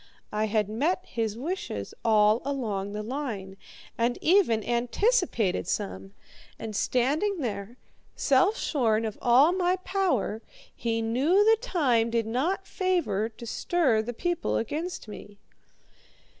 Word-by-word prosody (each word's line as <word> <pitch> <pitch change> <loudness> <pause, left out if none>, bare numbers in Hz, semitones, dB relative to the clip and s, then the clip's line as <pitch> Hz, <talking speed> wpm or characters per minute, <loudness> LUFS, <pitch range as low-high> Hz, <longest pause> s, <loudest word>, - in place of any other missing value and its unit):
I 215 +1 0
had 215 -1 +1
met 295 - -1
his 225 -2 -3
wishes 255 - -4
all 215 0 +4
along 215 -8 -3
the 210 0 -4
line, 220 -7 -5 0.4
and 240 +1 +1
even 320 - +3
anticipated 240 - +1
some; 95 0 -4 0.4
and 220 -2 -6
standing 295 - +1
there, 230 - -4 0.4
self 365 - +3
shorn 225 -6 +1
of 215 - -5
all 255 +7 +5
my 365 -1 +2
power, 370 - -1 0.3
he 225 -1 -1
knew 285 - +3
the 445 +1 +6
time 260 - +1
did 230 -1 0
not 305 - -1
favour 345 - 0
to 235 +1 -11
stir 260 -2 +1
the 230 +2 -4
people 350 +7 -1
against 315 +5 -4
me. 205 -1 -10
240 Hz, 130 wpm, -27 LUFS, 215-345 Hz, 0.4 s, the